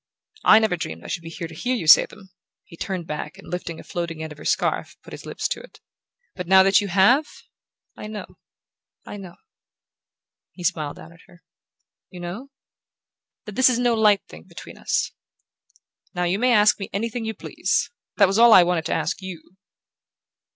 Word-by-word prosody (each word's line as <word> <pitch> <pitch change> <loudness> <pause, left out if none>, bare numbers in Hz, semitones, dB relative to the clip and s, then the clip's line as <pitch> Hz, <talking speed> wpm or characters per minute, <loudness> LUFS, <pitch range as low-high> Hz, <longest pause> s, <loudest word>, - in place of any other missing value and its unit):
"I 215 - +7
never 220 -4 +2
dreamed 80 - -6
I - - -9
should 175 - -3
be 165 - -9
here 165 0 -6
to 160 - -13
hear 245 +10 -2
you 200 - -4
say 155 - +8
them!" 195 -3 -16 0.3
He - - -15
turned 185 0 -4
back 150 +3 -6
and 195 - -14
lifting 170 -2 -5
a - - -10
floating 170 -2 -5
end 160 - -7
of 150 - -12
her - - -11
scarf - - -1
put - - -13
his - - -10
lips - - -3
to - - -3
it. - - -16 0.6
"But 180 -2 -6
now 190 +1 +7
that 195 +1 +4
you 205 - -3
have, 200 - +4 0.7
I - - -8
know 215 -1 -6 0.8
I - - -8
know," 185 -4 -10 1.2
he 180 - -10
smiled 155 -3 -1
down 170 - -13
at 165 - -19
her. 175 -2 -20 0.7
"You 180 - -11
know?" 185 +10 -7 1.0
"That 210 - -8
this 260 +5 +5
is 250 - +1
no 245 -1 +2
light 210 -3 +3
thing 80 +1 -13
between - - -12
us. - - -1 1.0
Now 180 - -1
you 180 +3 0
may 250 +1 +3
ask 215 -2 +4
me 195 - -6
anything 230 +3 -3
you 220 0 -4
please! - - -1 0.3
That 200 - +7
was 195 +3 0
all 235 -1 +8
I 185 - +9
wanted 175 -2 -1
to - - -1
ask 160 +4 -2
YOU." 185 -1 -10
190 Hz, 200 wpm, -23 LUFS, 170-215 Hz, 1.2 s, I